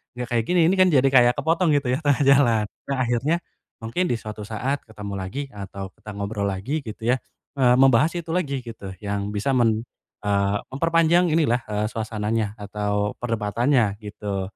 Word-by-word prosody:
enggak 125 -1 -4
kayak 115 -2 +2
gini, 180 0 +2
ini 190 - +2
kan 185 - +7
jadi 135 0 +5
kayak 125 -2 +6
kepotong," 165 +2 +1
gitu 135 -3 +1
ya, 130 - 0
tengah 145 -1 +3
jalan. 125 -6 +4 0.2
Nah, 140 - -1
akhirnya 130 +7 +1 0.5
mungkin 115 +12 -1
di 120 - -1
suatu 105 -1 -7
saat 125 +7 -2
ketemu 105 -2 -8
lagi 115 +10 -4
atau 100 -1 -6
kita 105 - -9
ngobrol 100 +1 -3
lagi 130 +11 -3
gitu 110 +1 -6
ya, 125 - +5 0.4
eee, 125 -2 +5
membahas 135 +3 +5
itu 170 -1 -10
lagi 140 -7 -1
gitu, 115 -5 -8
yang 100 0 -3
bisa 105 +6 -1
men 115 -2 +2 0.4
eee, 100 0 +1
memperpanjang 165 +4 +2
inilah, 135 -7 +2
eee, 105 0 -1
suasananya 110 -1 -2
atau 105 0 -2
perdebatannya 115 0 +1
gitu. 100 -2 -4
115 Hz, 175 wpm, -23 LUFS, 105-140 Hz, 0.5 s, kan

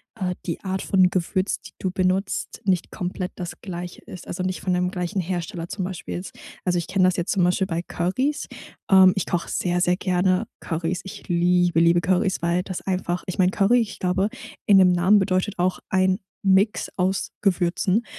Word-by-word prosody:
äh, 185 -4 -2
die 170 - -3
Art 190 -1 -2
von 185 -2 +3
Gewürz, 185 +2 -1
die - - -12
du 185 - -2
benutzt, 185 +1 -1
nicht 185 -3 0
komplett 180 0 -4
das 175 -1 -7
Gleiche 175 -2 -7
ist 180 - -10
also 180 - -4
nicht 185 0 -2
von 185 - 0
dem 180 0 +1
gleichen 180 +1 -2
Hersteller 175 0 -4
zum 195 - -3
Beispiel 185 -2 -6
jetzt. 180 - -6 0.3
Also, 180 -1 +1
ich 170 - -2
kenn 190 -1 +1
das 185 0 +4
jetzt 175 - -1
zum 190 - +2
Beispiel 180 +2 +2
bei 170 -1 -2
Currys. 255 +14 -1 0.4
Ähm, 190 -2 +7
ich 195 - -1
koch 175 -1 -2
sehr, 180 0 -1
sehr 180 0 +3
gerne 185 +2 +1
Currys. 165 +1 -2
Ich 195 - -10
liebe, 175 0 +3
liebe 170 +1 +4
Currys, 185 +1 +1
weil 170 +1 +1
das 185 -2 -5
einfach 180 -2 -2
ich 185 - -4
mein, 185 -1 +3
Curry 210 +5 +3
ich 215 -2 -5
glaube, 190 +3 +1 0.4
in 200 - +6
dem 185 -1 +6
Namen 180 +4 +4
bedeutet 190 +1 0
auch, 180 +1 +1
ein 185 0 +2 0.2
Mix 195 +2 +2
aus 190 +1 0
Gewürzen, 185 +3 +1
185 Hz, 195 wpm, -23 LUFS, 175-190 Hz, 0.4 s, Ähm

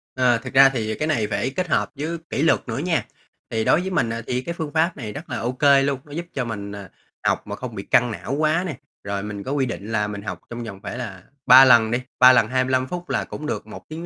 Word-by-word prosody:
Ờ, 125 -2 +3
thực 115 - -9
ra 135 0 +8
thì 110 -4 -3
cái 155 - -2
này 115 -9 0
phải 130 - -1
kết 185 -1 -1
hợp - - 0
với 160 +4 -3
kỷ 140 - -2
luật 160 - +4
nữa 115 - -3
nha. 165 +1 0 0.4
Thì 110 -1 -1
đối 165 - +4
với 190 - -3
mình 120 -10 +1 0.2
thì 125 0 -1
cái 170 +5 -5
phương 160 -3 -5
pháp 165 +1 +1
này 110 -5 -6
rất 155 +4 -9
là - - -3
OK 125 +4 -4 0.2
luôn, 140 -1 -1
nó 145 - -16
giúp 170 +4 -4
cho 130 -3 -2
mình, 100 -3 -5
à, 100 -2 -9 0.4
học - - 0
mà - - -4
không - - -7
bị - - -5
căng 120 -1 +3
não 120 +4 -5
quá 155 +4 +1
nè. 150 -8 -5 0.3
Rồi 100 0 -3
mình 105 -1 -6
có 135 - -5
quy 140 -2 +1
định 110 -2 -6
là 105 -2 0
mình 100 -1 -6
học 90 -4 -6
trong 120 0 -6
vòng 100 -4 -8
phải 120 - -5
là 95 -7 -7 0.2
3 130 +1 +9
lần 115 -3 +5
đi, 120 +1 0 0.2
3 130 0 +9
lần 115 -3 +4
25 130 +1 +1
phút 175 +2 -6
là - - 0
cũng 150 - -8
được - - -4
1 - - -11
tiếng 165 +2 -6
130 Hz, 275 wpm, -22 LUFS, 110-150 Hz, 0.4 s, 3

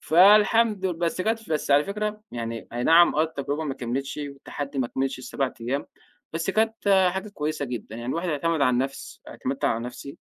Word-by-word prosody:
فالحمد 205 +4 +5
ل 185 - 0
بس 170 +1 -2
كانت 225 0 -1
بس 150 -2 -1
على 145 +1 +5
فكرة 210 +1 -3
يعني 115 -1 -5
أي 120 +1 -2
نعم، 170 +1 +6
آه 155 - +3
التجربة 150 -1 -3
ما 135 -3 -3
كمّلتش، 130 +3 -3
والتحدي 140 0 -6
ما 130 - +1
كملش 135 +2 -2
ال7 130 +1 -2
أيام، 130 +5 -2 0.5
بس 165 +3 -1
كانت 205 -3 +3
حاجه 190 +2 -4
كويسة 155 -6 -3
جدًا، 120 -4 -6
يعني 120 +1 -6
الواحد 170 +4 -2
يعتمد 160 +1 0
على 140 - +4
النفس 130 +2 -3
اعتمدت 135 +1 -4
على 115 - +1
نفسي. 125 +5 -8
150 Hz, 185 wpm, -25 LUFS, 135-190 Hz, 0.5 s, نعم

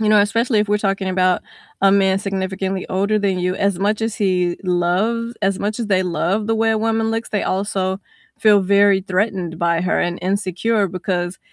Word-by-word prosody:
You 215 - +1
know, 210 -1 +6
especially 220 +2 +1
if 210 - -1
we're 210 0 +2
talking 195 -1 -1
about 185 -1 +1 0.4
a 195 - +6
man 195 -1 +3
significantly 190 -1 -3
older 200 +3 +1
than 195 -3 0
you, 180 +1 0
as 200 -3 0
much 210 +2 0
as 225 -1 -2
he 180 -3 0
loves 190 +7 0
as 195 -1 +1
much 215 +3 -3
as 220 - -3
they 185 -2 +2
love 180 +5 -1
the 225 - +1
way 225 0 +1
a 220 - +1
woman 225 0 0
looks, 225 +1 -3
they 205 - -1
also 190 0 -2 0.4
feel 210 -2 +5
very 200 0 +4
threatened 185 -3 -2
by 170 -1 +1
her 180 - 0
and 175 0 -1
insecure 200 +3 0
because 180 -1 -3
195 Hz, 200 wpm, -19 LUFS, 185-210 Hz, 0.4 s, know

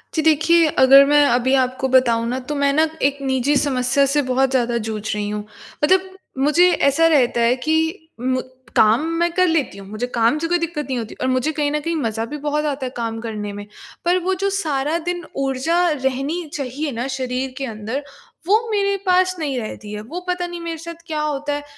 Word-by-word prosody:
जी। 315 - +2
देखिए, 320 +2 +4
अगर 275 -1 +7
मैं 295 +1 +5
अभी 250 +2 +2
आपको 255 +1 -2
बताऊँ 235 -3 +3
ना, 250 +2 -2
तो 280 +4 -5
मैं 280 0 +2
ना 315 +2 +3
एक 280 +1 +2
निजी 265 +1 +1
समस्या 270 0 +2
से 295 - +4
बहुत 265 +1 +2
ज़्यादा 240 -2 +1
जूझ 215 -1 -4
रही 205 0 -2
हूँ। 210 0 -4 0.4
मतलब 375 +4 +3 0.3
मुझे 300 +7 +4
ऐसा 310 +2 +3
रहता 255 -7 +3
है 235 +2 +3
कि 320 +4 -1
मु 255 +1 0 0.3
काम 220 +8 +4
मैं 345 0 +2
कर 365 +1 +3
लेती 320 - 0
हूँ, 195 -1 -10
मुझे 215 +4 -3
काम 230 +4 +3
से 330 - -2
कोई 350 +1 +2
दिक्कत 335 -3 -3
नहीं 260 - -1
होती 225 -2 -5
और 255 - 0
मुझे 255 +4 +1
कहीं 295 -1 -1
न 300 - 0
कहीं 330 +3 -2
मज़ा 225 -6 -2
भी 295 +6 -6
बहुत 300 +1 -1
आता 280 -2 -2
है - - -3
काम 225 -1 -3
करने 210 -3 -5
में। 205 0 -7 0.4
पर 350 +1 +3
वो 380 +1 +1
जो 395 - +2
सारा 305 -4 -1
दिन 350 0 -2 0.2
ऊर्जा 270 +6 0
रहनी 275 +4 -2
चाहिए 280 +2 -3
ना 240 +1 -3
शरीर 260 -1 -3
के 275 - -3
अंदर, 225 +4 -5 0.4
वो 440 +3 +2
मेरे 400 -1 +1
पास 370 0 +3
नहीं 285 -5 -2
रहती 215 -2 -7
है। 210 - -5
वो 300 +12 -6
पता 360 -1 -1
नहीं 350 0 -7
मेरे 335 -1 -4
साथ 335 +1 -9
क्या 310 -2 -2
होता 295 -1 -2
है 290 0 -4
280 Hz, 215 wpm, -20 LUFS, 250-320 Hz, 0.4 s, अगर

